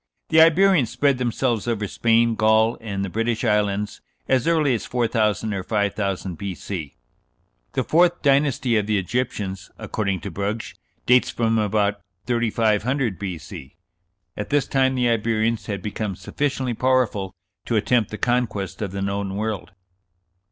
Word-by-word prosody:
The 160 - +6
Iberians 165 - +5
spread 140 0 +1
themselves 120 -2 -1
over 110 -3 -1
Spain, 115 +2 +2
Gaul, 110 +1 +3
and 100 -3 -3
the - - -4
British 115 +3 -1
Islands 105 -2 0 0.3
as 130 0 +2
early 155 -5 +3
as 115 - -2
4000 110 -3 0
or 95 - -2
5000 100 -3 -2
B.C.... 95 -5 -5 0.8
The - - 0
fourth 175 +2 +3
dynasty 135 -4 +2
(of 105 -1 0
the 105 -1 +2
Egyptians), 100 -2 -3
according 100 -4 -2
to 100 - -6
Brugsch, 100 +5 -3 0.3
dates 125 0 +4
from 115 -1 +1
about 105 -1 0 0.2
3500 115 0 0
B.C. 85 -5 -7 0.6
At 105 - -5
this 145 -1 +2
time 130 -1 +2
the 125 -1 +2
Iberians 115 0 0
had 100 -4 -4
become 105 -2 -3
sufficiently 130 +6 -2
powerful 115 -7 0 0.3
to 115 - -1
attempt 110 +1 +2
the 110 - -6
conquest 110 -7 -1
of 100 -3 -3
the 100 0 -3
known 100 0 -2
world." 105 -2 -3
110 Hz, 145 wpm, -23 LUFS, 100-125 Hz, 0.8 s, The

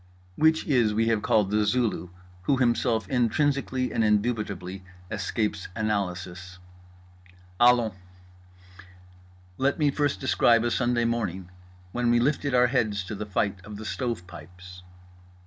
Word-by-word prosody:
Which 160 +4 +3
IS 120 -8 +2
we 115 +1 +2
have 110 -2 +1
called 105 -2 +2
The 105 0 +2
Zulu, 105 -4 0 0.4
who 135 - +2
Himself 120 -2 +1
intrinsically 130 +1 0
and 115 - +1
indubitably 105 -4 -1 0.3
escapes 105 0 -2
analysis. 90 -4 -3 1.0
Allons! 120 -3 +4 1.7
Let 135 +1 +1
me 150 -2 +2
first 145 -8 0
describe 110 +5 +3
a 120 - 0
Sunday 120 -1 +1
morning 95 -6 -2 0.4
when 120 +2 0
we 120 0 +4
lifted 140 +1 0
our 125 0 +5
heads 110 -6 0
to 95 - -7
the 105 +1 -5
fight 100 -1 -1
of 105 +1 -9
the 110 - -8
stove 100 0 -3
pipes. 90 +1 -12
110 Hz, 130 wpm, -26 LUFS, 95-125 Hz, 1.7 s, our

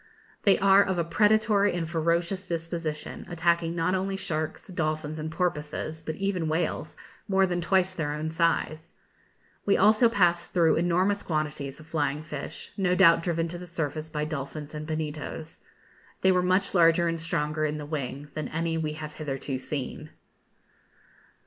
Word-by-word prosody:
They 200 - +6
are 195 0 +6
of 190 -2 0
a 170 - +2
predatory 210 +3 +3
and 165 -2 -2
ferocious 170 +3 0
disposition, 165 -2 -4
attacking 170 0 +1
not 170 +2 +1
only 195 +1 -1
sharks, 155 -5 -3
dolphins, 155 -4 -2
and 155 +1 -3
porpoises, 160 -2 -2
but 155 0 -4
even 195 -3 -1
whales, 155 -1 -2 0.3
more 195 -1 +4
than 175 -1 -1
twice 185 +1 +2
their 160 -5 -2
own 155 +1 -3
size. 165 -1 0 0.7
We 200 - +3
also 215 +4 +5
passed 175 -5 +2
through 170 -4 +4
enormous 180 +4 +2
quantities 150 -4 -3
of 155 - -12
flying 150 -2 -1
fish, 150 -2 -7
no 180 -2 +2
doubt 170 -3 +6
driven 165 -1 0
to 175 +1 -6
the 180 - -8
surface 160 -2 -3
by 150 -1 -2
dolphins 150 0 -5
and 155 0 -6
bonitos. 155 0 -5 0.6
They 190 - +5
were 180 -1 +3
much 185 +2 +2
larger 170 -1 +5
and 165 -1 -2
stronger 155 -2 -1
in 150 0 0
the 150 - -6
wing 145 -1 -4
than 155 - -3
any 165 0 -1
we 155 -1 -2
have 150 0 -7
hitherto 135 -3 -4
seen. 145 +2 -5
165 Hz, 160 wpm, -27 LUFS, 155-180 Hz, 0.7 s, They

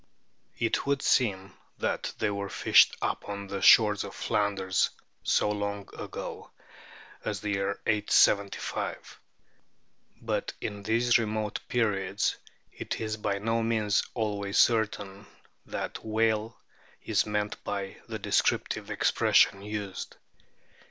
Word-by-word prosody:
* - - -40
It 115 - -1
would 140 -1 +1
seem 100 -6 +1 0.2
that - - -2
they 105 - 0
were 100 -1 -4
fished - - +5
upon 100 0 -3
the 100 0 -5
shores 105 0 +6
of - - -8
Flanders 100 -3 0 0.3
so 105 - +2
long 100 -1 -2
ago - - -7 0.7
as 100 -3 -3
the 105 - -2
year 100 0 -1
875, 105 -1 +1 1.0
but - - -2
in 100 -1 -5
these 115 +3 +3
remote 110 -2 -2
periods 100 -4 0 0.4
it - - -5
is 110 -1 -2
by 100 -2 -1
no 115 +3 0
means 110 -3 +1
always 100 -3 -2
certain 105 -3 +1 0.4
that - - -5
whale 110 0 0 0.5
is 105 -2 +1
meant 105 0 -2
by 100 -1 -4
the - - -4
descriptive - - 0
expressions 100 +1 +3
used. 105 -2 -5
105 Hz, 120 wpm, -28 LUFS, 100-110 Hz, 1.0 s, shores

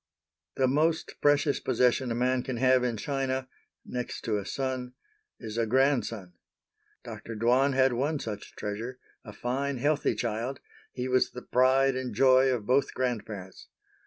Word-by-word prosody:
The 130 - +2
most 155 +5 +1
precious 145 0 +3
possession 125 0 +1
a - - -1
man 125 +1 +1
can 125 -1 -4
have 130 0 +4
in 120 -3 -1
China, 135 +1 -2 0.4
next 125 -1 -5
to 105 -2 -1
a 100 - -7
son, 130 -2 -3 0.5
is 110 -1 -5
a 115 - +1
grandson. 120 -7 +1 0.7
Dr. 115 - -8
Dwan 125 +5 +3
had 130 -1 +3
one 145 +6 0
such 105 -6 -7
treasure; 115 +5 -5 0.3
a 105 - -9
fine 135 +5 -2
healthy 145 +4 +1
child, 120 +4 -3 0.3
he 125 0 -4
was 130 0 +2
the 125 - -9
pride 130 +1 +3
and 130 -4 -4
joy 130 +2 +5
of 120 -5 -1
both 130 +4 +1
grandparents. 110 -7 -4
130 Hz, 155 wpm, -28 LUFS, 115-135 Hz, 0.7 s, joy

